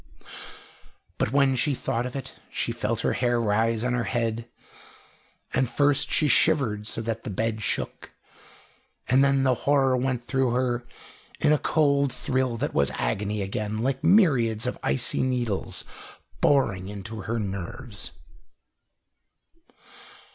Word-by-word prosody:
But - - 0
when 140 -1 +3
she 135 +3 +1
thought 120 0 -2
of 125 - -9
it, 135 - -6 0.2
she - - -2
felt - - -2
her - - +1
hair 120 -1 +1
rise 115 +1 +1
on 125 0 0
her 120 -1 0
head, 115 -1 -2 1.0
and 130 - +1
first 145 0 +2
she 155 - +2
shivered 130 -10 +2
so 115 - -2
that 115 0 -3
the - - -5
bed 110 +2 -2
shook, - - -3 1.0
and 130 +2 +4
then 140 -1 +3
the 130 -1 +4
horror 135 +1 +2
went 125 -1 -1
through 130 -1 0
her 120 -1 -1 0.5
in 150 - +4
a 150 - +2
cold 140 -3 +2
thrill 130 -2 -1
that 145 +6 -2
was 70 -2 +2
agony 100 - -1
again, 105 +3 -3
like 135 +1 -1
myriads 135 - +4
of - - -3
icy 65 0 +2
needles 120 -6 -1 0.6
boring 100 -10 +2
into 105 +2 -7
her 115 +5 -2
nerves. 100 +2 -6
120 Hz, 140 wpm, -26 LUFS, 110-135 Hz, 1.0 s, and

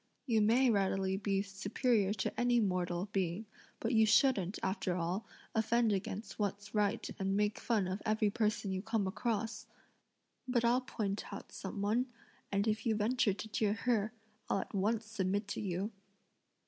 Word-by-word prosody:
You 225 -4 +3
may 240 +4 +5
readily 195 -2 +1
be 195 0 0
superior 200 +2 +1
to 215 - -2
any 245 0 +4
mortal 180 -2 0
being, 190 +2 -1 0.3
but 230 +2 -1
you 220 -1 +5
shouldn't, 210 -6 +4
after 190 -2 0
all, 180 +4 -2 0.3
offend 225 0 +3
against 195 +3 -4
what's 205 0 -2
right 210 -2 +1
and 195 0 +1
make 210 0 +1
fun 215 -6 +1
of 185 +2 -3
every 215 -1 +2
person 210 -2 0
you 190 0 -1
come 220 -1 0
across! 225 +3 -2 0.8
But 240 -2 +2
I'll 245 +2 +4
point 205 -5 -3
out - - -8
some 200 +1 -5
one, 230 +5 +2 0.4
and 200 +2 +1
if 215 0 0
you 220 - +3
venture 215 0 +2
to 220 - -6
jeer 210 -1 +1
her, 225 -2 +1 0.4
I'll 195 - +2
at - - -9
once 215 +3 +1
submit 205 -1 -1
to - - -3
you." 195 +1 -2
210 Hz, 165 wpm, -34 LUFS, 195-225 Hz, 0.8 s, may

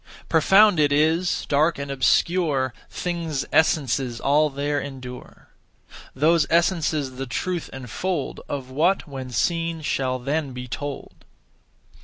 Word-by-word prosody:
Profound 190 +3 +5
it 145 -1 +3
is, 160 +5 +1
dark 155 +3 +2
and 140 0 -5
obscure; 135 0 +1 0.2
Things' 170 -5 -3
essences 135 -6 +2
all 150 +2 +3
there 145 +1 -1
endure. 130 -3 -9 0.7
Those 155 +3 +3
essences 160 -6 +1
the 135 0 -4
truth 175 +8 -3
enfold 130 - -4
Of 135 -2 -5
what, 170 +8 +1
when 135 -3 -7
seen, 165 +6 -1
shall 130 -3 -1
then 140 +2 -2
be 125 0 -7
told. 140 +3 -7
145 Hz, 120 wpm, -23 LUFS, 130-165 Hz, 0.7 s, Profound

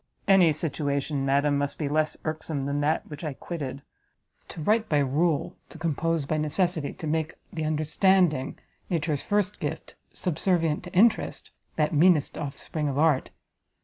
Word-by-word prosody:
"Any 190 -4 +6
situation, 145 -2 -2
madam, 140 +1 +2
must 145 0 -2
be 150 - -2
less 155 +1 0
irksome 155 -3 -3
than 140 +1 -1
that 155 +2 0
which 150 +1 -9
I 150 -4 -3
quitted: 140 -5 -6 0.6
to - - -9
write 215 +7 +1
by 150 - +3
rule, 145 +3 +1
to - - -11
compose 165 -1 -1
by 155 +2 -1
necessity, 155 0 0
to - - -8
make 155 0 -1 0.2
the 160 -3 -2
understanding, 155 -1 +2 0.3
nature's 160 -4 0
first 205 -1 0
gift, - - -5 0.2
subservient 165 -2 0
to 180 - -10
interest, 215 +5 +2 0.2
that 150 +1 +1
meanest 155 -1 +4
offspring 150 +2 -4
of 140 -1 -2
art! 150 -3 +3
155 Hz, 150 wpm, -26 LUFS, 145-170 Hz, 0.6 s, Any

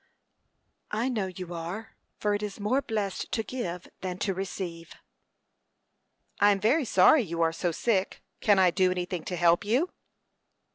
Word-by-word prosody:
"I 225 +5 0
know 215 -7 -1
you 180 -1 -7
are; 175 +7 -6 0.2
for 210 0 0
it 205 - -1
is 210 -1 -5
more 245 +7 +1
blessed 210 -6 -3
to 225 -3 0
give 180 -9 -5
than 185 -1 -4
to 195 0 -1
receive." 180 -3 -5 1.4
"I 205 - +6
am 200 -1 +3
very 265 +9 +3
sorry 205 +8 +6
you 170 -5 -1
are 165 0 +2
so 175 +1 -1
sick. 195 +2 -1 0.2
Can 205 -2 +4
I 185 -2 +5
do 185 0 +3
anything 180 -2 -3
to 180 - -3
help 170 0 +3
you?" 250 - +1
195 Hz, 160 wpm, -28 LUFS, 180-215 Hz, 1.4 s, I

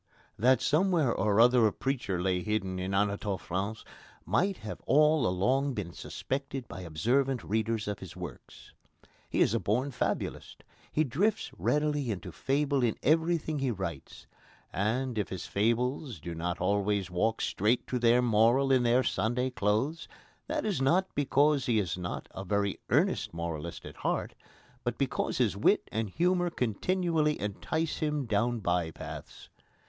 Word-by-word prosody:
That 125 +3 +4
somewhere 160 -5 +3
or 105 +1 +1
other 120 -1 +6
a - - 0
preacher 120 -10 -2
lay 90 0 0
hidden 95 -3 -2
in 95 +1 -3
Anatole 100 0 0
France 100 +6 -4 0.4
might 195 +1 +1
have 105 - -6
all 150 -2 +4
along 130 +9 +1
been 90 -5 -4
suspected 135 -2 -4
by 95 - -8
observant 120 - 0
readers 110 0 -1
of 105 -1 -3
his 95 -3 -9
works. 90 -8 -10 0.6
He - - 0
is - - +4
a - - +2
born 125 +7 0
fabulist. 125 - -3 0.3
He 155 - +2
drifts 190 - 0
readily 150 -3 0
into 95 -3 -4
fable 140 - 0
in 120 -3 +1
everything 160 0 +2
he 135 -1 0
writes. 95 - -5 0.5
And, 120 +3 0
if 105 - -2
his 95 - -5
fables 120 - 0
do 85 +3 -6
not 85 +2 -3
always 100 0 0
walk 110 +6 +1
straight 110 +5 +1
to 125 - -2
their 120 +1 +4
moral 120 +4 +4
in 130 -1 +5
their 120 +2 +3
Sunday 125 +2 0
clothes, 125 +9 0 0.4
that 305 0 -2
is 195 -10 0
not 180 +8 +2
because 145 0 +2
he 120 -3 +3
is 95 -5 0
not 90 -1 -5
a 95 - -6
very 100 0 0
earnest - - +1
moralist 85 -1 -5
at - - -10
heart, - - -2 0.5
but - - -2
because - - -1
his - - +2
wit - - +2
and 110 -1 -2
humour 175 - +1
continually 160 - 0
entice 155 +10 -2
him 150 -3 -1
down 115 +2 0
by 90 -3 0
paths. - - -9
120 Hz, 155 wpm, -30 LUFS, 100-140 Hz, 0.6 s, other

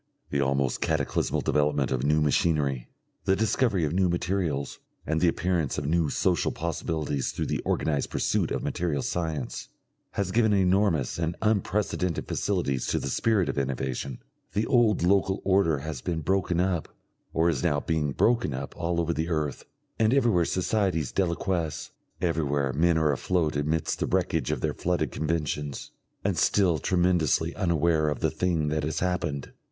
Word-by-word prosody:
The 70 - +1
almost 70 -1 0
cataclysmal 80 -3 0
development 75 -2 +1
of 65 -1 0
new 75 +2 +3
machinery, 70 -3 +1 0.4
the 95 - +3
discovery 110 -4 +1
of 75 - -2
new 95 0 +2
materials, 85 -5 -1 0.3
and 80 +1 0
the 90 - +4
appearance 85 -3 0
of 75 - -2
new 80 0 +1
social - - +1
possibilities 80 -3 -2
through - - -3
the - - -2
organised 75 -3 0
pursuit - - 0
of - - -2
material 80 -6 -1
science, 80 -7 -3 0.5
has 100 -2 -1
given 110 0 +3
enormous 95 -7 +2
and 85 +1 -1
unprecedented 100 -4 0
facilities 75 -10 -1
to - - 0
the 70 - -3
spirit 105 - +2
of - - -1
innovation. 65 -1 -3 0.4
The 105 +2 +1
old 120 -7 +3
local 95 +1 +2
order 95 -5 +3
has 75 -2 -5
been 85 -2 -2
broken 90 0 0
up 90 -3 0 0.4
or 80 +1 +2
is 80 -6 +1
now 75 - +1
being 75 -2 -1
broken 115 - +2
up 70 +2 -6
all 85 0 -1
over 85 0 0
the 80 +2 -2
earth, 75 -4 -2 0.3
and 110 +3 +3
everywhere 115 -11 +3
societies 95 - 0
deliquesce, 85 -3 -1 0.3
everywhere 75 -6 0
men 85 +2 +3
are 80 -2 +3
afloat 80 +2 0
amidst 75 +2 -1
the - - 0
wreckage - - 0
of - - -1
their - - 0
flooded 90 0 -1
conventions, 75 -3 -3 0.3
and - - 0
still 90 -6 +3
tremendously 85 -2 +2
unaware 85 -4 +2
of 75 - -3
the - - +1
thing 85 -5 0
that 75 0 0
has 75 +2 -2
happened. 85 -6 -2
80 Hz, 160 wpm, -27 LUFS, 75-90 Hz, 0.5 s, the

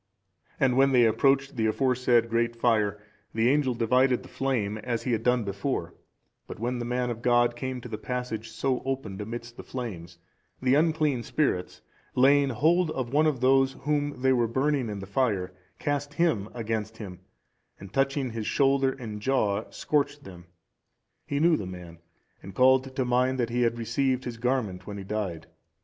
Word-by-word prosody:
And 130 -2 +2
when 135 0 +4
they 120 -2 +6
approached 135 +5 +2
the 110 -1 +2
aforesaid 125 -1 +2
great 115 0 0
fire, 110 -3 +1 0.4
the 115 +1 +3
angel 135 -3 +2
divided 125 +2 +2
the - - -13
flame, 110 -6 -1
as 115 +1 -3
he 125 - -1
had 115 - 0
done 125 -1 +2
before; 100 -3 -3 0.5
but - - -8
when 120 +2 -2
the 120 - -3
man 125 0 -1
of 115 -1 -6
God 120 -1 +3
came 130 +1 -4
to 125 - -8
the 110 -2 -6
passage 125 -3 -4
so 125 +3 -1
opened 130 -7 -4
amidst 120 +2 -7
the - - -8
flames, 90 -9 -7 0.4
the 130 0 +2
unclean 155 -3 +2
spirits, 115 -9 -1 0.3
laying 140 +2 +5
hold 165 +7 +2
of 130 -4 -4
one 155 +2 +4
of 140 -5 -1
those 135 +1 +4
whom 145 -2 -1
they 130 0 +4
were 120 -2 +2
burning 130 +1 0
in 105 - -4
the 95 - -7
fire, 100 -4 0 0.2
cast 145 0 -2
him 145 - +1
against 110 -1 -3
him, 95 -5 -8 0.6
and, 95 0 -11
touching 135 -1 0
his 110 -1 -4
shoulder 135 -1 +2
and 110 -5 -7
jaw, 110 -5 0
scorched 145 -1 -1
them. 90 -2 -12 0.8
He 140 - -1
knew 165 +1 +4
the 95 - -5
man, 90 -2 -9 0.4
and 95 -1 -10
called 130 +1 +4
to 130 - 0
mind 125 +1 +2
that 120 -1 0
he 120 +1 0
had 120 -1 +1
received 130 +3 0
his 120 -2 -6
garment 115 -7 -2
when 100 -1 -6
he 100 - -6
died. 95 -4 -4
125 Hz, 180 wpm, -27 LUFS, 110-135 Hz, 0.8 s, they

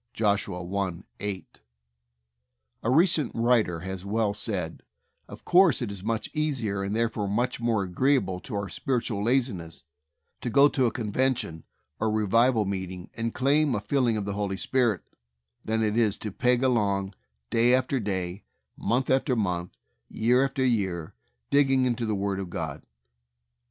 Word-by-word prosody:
(Josh, 105 -2 +1
i: 90 0 -3 0.2
8.) 100 -2 -6 1.2
A 115 - -1
recent 155 0 +3
writer 115 -8 +2
has 95 0 -6
well 105 +1 0
said, 100 -6 -4 0.5
"Of - - -12
course, 180 -5 +5
it 120 -5 -3
is 95 -2 -7
much 110 0 -1
easier, 130 -11 -1
and 100 +2 -2
therefore 115 -3 0
much 120 +6 -1
more 115 -4 +1
agreeable 95 0 +1
to 105 - -7
our 100 -1 -2
spiritual 120 -3 -2
laziness, 115 -9 -1 0.6
to 125 - -2
go 140 +5 +6
to 130 -3 +2
a - - 0
convention 115 - -1 0.3
or 110 - +1
revival 110 +2 +3
meeting 95 -2 -5
and 115 0 -2
claim 140 0 +2
a - - 0
filling 120 0 +1
of 105 - -3
the 100 - -3
Holy 100 -1 -2
Spirit 120 -5 +1 0.6
than 110 0 0
it 105 -1 0
is 110 -4 +2
to 105 - -5
peg 125 +5 +2
along 100 -6 +1 0.4
day 115 +2 +4
after 130 +1 +2
day, 95 -3 -3 0.3
month 130 +3 0
after 130 0 +2
month, 90 -5 -2 0.3
year 125 +4 +3
after 135 -1 0
year, 95 -9 -1 0.4
digging 135 -2 +4
into 120 -2 -1
the 110 - 0
Word 100 0 -1
of 95 -2 -5
God. - - -4
110 Hz, 155 wpm, -27 LUFS, 100-125 Hz, 1.2 s, go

